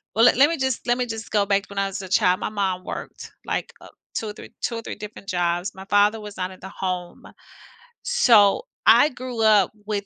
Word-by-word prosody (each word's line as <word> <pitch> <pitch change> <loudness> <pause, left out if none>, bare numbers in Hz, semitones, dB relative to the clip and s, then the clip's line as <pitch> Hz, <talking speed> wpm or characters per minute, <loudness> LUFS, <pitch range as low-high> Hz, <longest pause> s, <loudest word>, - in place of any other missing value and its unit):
well, 225 +2 +5
le - - +7
let 280 +4 +5
me 335 - -2
just 265 -3 -2
let 240 0 +2
me 250 - 0
just 225 -1 -6
go 205 -2 +2
back 200 0 +1
to - - -17
when 200 - -10
I 195 - +1
was 195 0 -5
a 190 - -9
child, 180 0 +3
my - - -3
mom 190 -3 -2
worked, - - -8
like, - - -3
uh, - - -12 0.3
2 220 - -3
or - - -6
three - - -12
2 245 - -2
or - - -5
3 - - -7
different 210 -1 -10
jobs. 175 +1 -1
My 190 0 -10
father 205 +2 +3
was 210 -1 -9
not 185 -1 -2
at 185 - -13
the 190 - -8
home. 180 -2 -5 0.8
So 245 - +4 0.2
I 300 - +7
grew 250 -3 -6
up 210 -4 +5
with 205 -1 -3
205 Hz, 245 wpm, -23 LUFS, 190-230 Hz, 0.8 s, le